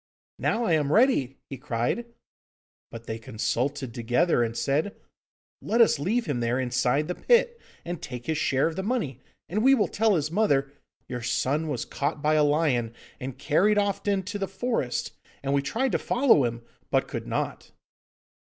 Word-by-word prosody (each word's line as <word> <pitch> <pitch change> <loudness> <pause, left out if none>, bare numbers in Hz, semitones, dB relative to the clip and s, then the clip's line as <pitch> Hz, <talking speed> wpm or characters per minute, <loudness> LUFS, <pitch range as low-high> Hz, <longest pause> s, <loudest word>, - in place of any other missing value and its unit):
'Now 230 +2 0
I 180 - +2
am 150 -2 +1
ready!' 185 - +3
he 135 - -8
cried; 130 - -2 0.8
but 115 0 -10
they 110 0 -5
consulted 120 +4 -2
together 120 +6 +2
and 115 0 -3
said, 150 +8 0 0.7
'Let 230 - 0
us 230 -10 +5
leave 220 +11 0
him 140 -5 -2
there 120 +2 0
inside 130 +3 +1
the 180 - -2
pit, 475 - +2 0.2
and 175 -1 -5
take 125 -1 -7
his 160 -1 -1
share 135 -2 +2
of 165 0 -1
the 190 - -2
money, 195 - -2 0.3
and 215 +5 -1
we 270 +1 +6
will 215 - +2
tell 220 -1 +2
his 155 -1 -1
mother, 145 -9 +2 0.4
"Your 125 -1 -5
son 135 +6 0
was 135 -6 -2
caught 145 +2 -2
by 150 +1 +2
a 155 -1 +4
lion 145 -7 +1 0.2
and 130 0 -6
carried 200 +8 +2
off 205 0 0
into 200 0 -1
the 195 - -1
forest, 195 - -2 0.3
and 135 0 0
we 140 - +3
tried 230 - -1
to - - +1
follow 245 - +4
him, 115 0 -4 0.3
but - - +1
could - - -5
not." - - -3
150 Hz, 180 wpm, -26 LUFS, 125-205 Hz, 0.8 s, we